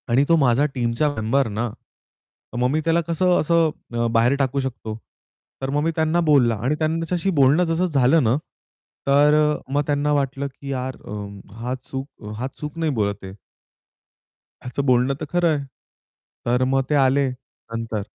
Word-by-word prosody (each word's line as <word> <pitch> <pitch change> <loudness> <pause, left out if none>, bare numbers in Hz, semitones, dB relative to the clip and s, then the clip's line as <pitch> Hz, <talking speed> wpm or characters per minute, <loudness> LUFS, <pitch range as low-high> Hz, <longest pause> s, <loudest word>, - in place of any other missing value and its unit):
आणि 125 +4 +4
तो 165 - +6
माझा 135 -2 +3
टीमचा 120 +4 +1
मेंबर 115 +5 +1
ना. 110 +3 -2 0.9
मग 125 +1 +2
मी 150 +4 +1
त्याला 165 +1 +3
कसं 175 +2 +2
असं 165 0 +3 0.3
अ, 115 0 +1
बाहेर 115 +4 +3
टाकू 140 0 0
शकतो. 120 -5 -4 0.7
तर 135 - -2
मग 145 +2 0
मी 165 - +1
त्यांना 160 +1 +1
बोलला 125 -6 +4
आणि 135 +5 +1
त्यांच्याशी 165 +3 -1
बोलणं 140 +6 +5
जसं 165 +1 +1
झालं 145 -1 +3
ना, 115 +1 +3 0.7
तर 145 +2 +5
अ, 150 -2 +1
मग 145 - +3
त्यांना 145 0 +1
वाटलं, 140 -1 -1
की 140 +1 -11
यार 130 0 -3
अ, - - -9 0.5
हा 125 +2 -2
चूक 135 -1 -8
हा 125 +3 -2
चूक 150 +2 -6
नाही 160 -2 0
बोलत 100 -1 -1
आहे. 95 0 -8 1.3
याचं 130 +3 -3
बोलणं 125 +1 +3
तर - - -2
खरं 175 -1 +2
आहे. 140 - -5 0.8
तर 125 +2 +2
मग 135 +1 +2
ते 150 - +2
आले, 135 +1 +2
नंतर. 115 -3 -6
140 Hz, 170 wpm, -22 LUFS, 125-155 Hz, 1.3 s, तो